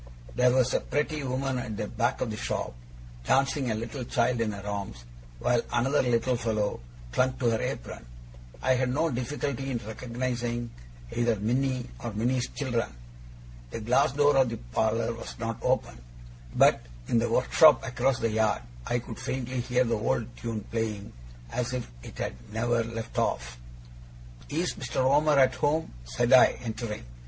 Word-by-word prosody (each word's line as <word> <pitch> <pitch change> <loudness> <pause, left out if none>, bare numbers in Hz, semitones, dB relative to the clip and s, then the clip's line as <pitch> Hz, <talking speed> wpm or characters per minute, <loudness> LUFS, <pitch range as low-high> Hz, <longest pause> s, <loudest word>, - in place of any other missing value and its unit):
There 125 0 +4
was 130 0 +3
a - - +3
pretty 150 +1 -1
woman 130 0 -1
at 115 -4 -5
the 105 - -2
back 120 +2 -1
of 115 - -1
the - - -3
shop, 100 - -3 0.5
dancing 135 - +2
a 110 - 0
little 115 +4 -4
child 120 0 +1
in 110 -2 +1
her 100 -1 -8
arms, 100 -12 -5 0.3
while 120 - +2
another 130 +5 +2
little 125 0 +2
fellow 110 -3 -1 0.3
clung 130 - +2
to 120 -2 +2
her 110 - 0
apron. - - -4 0.6
I 130 - +4
had 130 0 +1
no 160 +4 +1
difficulty 135 +1 -2
in 125 - -1
recognizing 120 +1 -3 0.4
either 120 -1 +2
Minnie 125 +4 0 0.2
or 120 -2 -3
Minnie's 120 +4 0
children. 120 -5 -1 0.8
The 115 - -5
glass 125 +3 +3
door 145 0 +4
of 130 -2 +4
the 115 - -4
parlour 110 - 0
was 115 - -8
not 115 -1 -3
open; 60 - 0 0.6
but - - +5 0.3
in 115 - +3
the 120 +1 0
workshop 130 +6 +5
across 125 +1 +1
the 115 -1 0
yard 110 - +1 0.2
I 120 - +1
could 115 -2 -7
faintly 130 0 -3
hear 125 +1 +2
the 115 -2 0
old 115 +2 -1
tune 115 -2 -4
playing, 110 -3 -3 0.4
as 125 0 -2
if 125 -2 -3
it - - -11
had - - -2 0.2
never 115 +1 +1
left 115 0 -4
off. - - -1 0.9
'Is 170 +5 0
Mr. 120 - -7
Omer 145 +2 +4
at 130 -1 +5
home?' 145 - 0
said 120 - +1
I, 130 - +7
entering. 110 - -4
120 Hz, 165 wpm, -28 LUFS, 115-130 Hz, 0.9 s, I